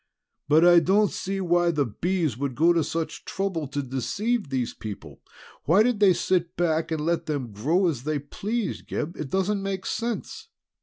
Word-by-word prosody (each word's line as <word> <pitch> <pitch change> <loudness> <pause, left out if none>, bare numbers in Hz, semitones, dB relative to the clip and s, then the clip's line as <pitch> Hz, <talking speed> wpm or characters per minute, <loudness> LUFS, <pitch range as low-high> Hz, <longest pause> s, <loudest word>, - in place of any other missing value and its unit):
"But 155 +4 +5
I 175 -1 +8
don't 200 +4 +3
see 195 +1 -3
why 175 -1 +2
the 150 -4 +1
Bees 165 - -1
should 130 +2 -3
go 165 +6 +4
to 165 -2 +2
such 165 +1 -4
trouble 190 -6 -3
to 145 +1 -3
deceive 200 - -2
these 130 -3 -2
people. 90 -9 -9 0.4
Why 190 +8 +5
did 245 -3 +1
they 200 -3 +6
sit 175 0 0
back 165 -2 +1
and 160 -2 -1
let 170 0 0
them 140 -7 -3
grow 155 - +1
as 145 -8 -1
they 155 +2 -1
pleased, 205 - -4
Gib? 155 +3 -3
It 150 - -5
doesn't 195 +3 0
make 195 -1 -3
sense!" 235 - -4
170 Hz, 185 wpm, -25 LUFS, 145-190 Hz, 0.4 s, I